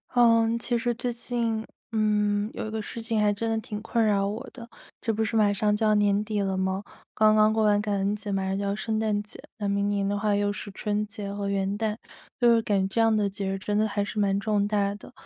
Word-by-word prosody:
呃， 230 -2 +5
其 240 +1 -1
实 240 +1 0
最 240 +1 -3
近， 230 -2 -2 0.3
嗯， 210 -1 +1
有 - - -4
一 - - -6
个 220 0 -3
事 230 +2 -6
情 225 -1 -1
还 210 -1 +3
真 225 +3 -2
的 225 - 0
挺 210 -1 -6
困 230 +1 0
扰 200 -2 +2
我 220 +6 -5
的。 235 -2 -10 0.3
这 225 - 0
不 220 +1 0
是 220 +1 -2
马 210 -2 +4
上 210 +1 +1
就 220 +1 0
要 215 - +4
年 205 0 +2
底 215 -1 -2
了 195 -1 -1
吗？ 190 +1 -1 0.3
刚 215 0 +4
刚 215 0 +5
过 220 0 +2
完 205 -1 +3
感 205 -1 -1
恩 195 +2 0
节， 210 0 -5
马 195 -1 0
上 190 0 -1
就 200 - -2
要 200 0 -1
圣 220 0 -2
诞 215 -2 0
节， 210 - -13 0.2
那 205 -2 -2
明 200 0 +1
年 200 -1 0
的 205 +1 0
话 205 0 +1
又 205 0 +1
是 205 - -6
春 210 +1 -2
节 205 -1 -6
和 200 -1 -3
元 195 0 -1
旦， 215 -1 -1 0.4
就 240 -1 +5
是 230 - +3
感 200 -3 +1
这 230 - +1
样 225 -1 +4
的 205 -2 +1
节 195 0 -4
日 195 - -2
真 205 +2 -2
的 215 +1 +3
还 205 -1 -1
是 215 +1 -4
蛮 200 -1 +2
重 205 -1 +1
大 200 -1 +1
的。 205 - -13
210 Hz, 285 characters per minute, -26 LUFS, 200-220 Hz, 0.4 s, 呃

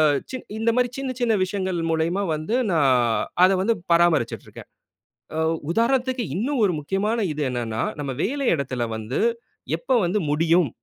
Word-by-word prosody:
அ - - +6 0.5
இந்த 230 +1 +2
மாதிரி 250 0 +3
சின்ன 270 -1 -2
சின்ன 235 -2 +2
விஷயங்கள் 185 -2 -2
மூலயமா 165 +5 0
வந்து 155 +11 -2 0.2
நான் 145 -5 +3 0.5
அதை 190 +1 +4
வந்து 230 +4 +2 0.2
பராமரிச்சுட்டு 170 -8 +2
இருக்கேன். - - -12 0.7
ஆ - - -2 0.3
உதாரணத்திற்கு 250 +4 +1
இன்னும் 250 +6 0
ஒரு 185 - +1
முக்கியமான 195 +9 -1 0.2
இது 150 - -4
என்னன்னா, 115 -3 -2 0.2
நாம 140 -2 -3
வேலை 275 +3 -1
இடத்தில 130 -4 -2
வந்து 110 +4 -3 0.6
எப்போ 255 +9 0
வந்து 185 +5 0
முடியும், 165 0 +3
185 Hz, 150 wpm, -23 LUFS, 150-230 Hz, 0.7 s, அ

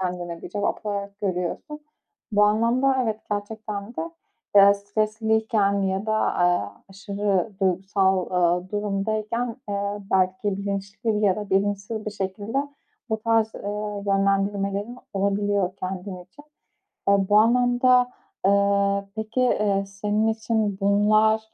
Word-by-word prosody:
kendine 175 -2 -4
bir - - -7
cevap 205 +3 -2
olarak 200 0 -4
görüyorsun. 195 - -3 0.5
Bu 205 0 +4
anlamda 235 +6 +2
evet, 220 -2 -2
gerçekten 205 0 -4
de, 330 - -3 0.5
eee, 200 0 +8
stresliyken 215 0 0
ya 190 +2 -1
da, 215 - +1
aaa, 175 -4 0
aşırı 200 0 -1
duygusal, 190 0 +1
ııı, 180 0 +1
durumdayken, 215 +3 -2
aaa, 200 0 -2
belki 190 +1 +1
bilinçli 200 +2 -2
ya 190 -2 +3
da 210 -1 -6
bilinçsiz 200 +2 0
bir - - -1
şekilde 205 +7 -3 0.4
bu 220 0 -1
tarz, 225 0 +2
ııı, 205 0 -4
yönlendirmelerin 200 +3 0
olabiliyor 200 -1 0
kendin 185 -1 -6
için. 240 +11 -18 0.6
Aaa, 200 -1 +3
bu 205 - +6
anlamda, 245 +2 +4 0.3
aaa, 200 0 +3
peki, 220 +3 -2
eee, 205 -5 +2
senin 205 +2 -1
için 220 -2 0
bunlar, 215 +2 +4
205 Hz, 120 wpm, -24 LUFS, 195-220 Hz, 0.6 s, eee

